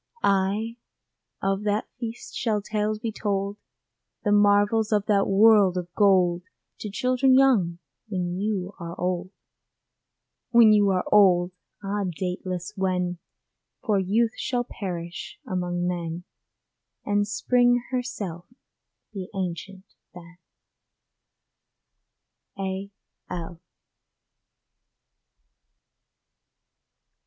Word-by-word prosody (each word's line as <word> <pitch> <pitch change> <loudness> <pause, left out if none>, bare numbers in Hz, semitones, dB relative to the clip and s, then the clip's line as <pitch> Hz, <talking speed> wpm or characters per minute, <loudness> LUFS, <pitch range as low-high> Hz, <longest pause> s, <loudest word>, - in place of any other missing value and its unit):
Ay, 200 +4 +1 0.7
of 195 0 0
that 210 +1 0
feast 230 -1 -6
shall 220 -3 0
tales 210 +1 -1
be 220 +1 -4
told, 200 -1 -2 0.7
The 205 - +1
marvels 205 +2 +4
of 205 -1 +2
that 200 -2 +2
world 200 -2 +5
of 175 -1 -5
gold 185 -4 +3 0.4
To 210 - -5
children 255 +5 +2
young, 215 -11 +3 0.3
when 180 -3 -3
you 200 -2 -2
are 170 -1 -7
old. 180 0 -1 1.2
When 230 -3 +7
you 205 -1 +4
are 185 -1 +1
old! 185 -3 +5 0.3
Ah, 200 0 -1
dateless 180 0 -4
when, 180 -2 -1 0.7
For 205 -3 +2
youth 220 +5 +1
shall 245 -1 -1
perish 175 -7 -6
among 175 -1 -2
men, 170 -1 -3 0.8
And 205 0 +1
Spring 245 +3 +2
herself 210 -9 -4 0.7
be 190 -2 -6
ancient 190 +1 -5 0.3
then. 175 0 -13 2.2
A. 195 +1 -4 0.4
L. 170 -1 -6
195 Hz, 95 wpm, -25 LUFS, 180-215 Hz, 2.2 s, When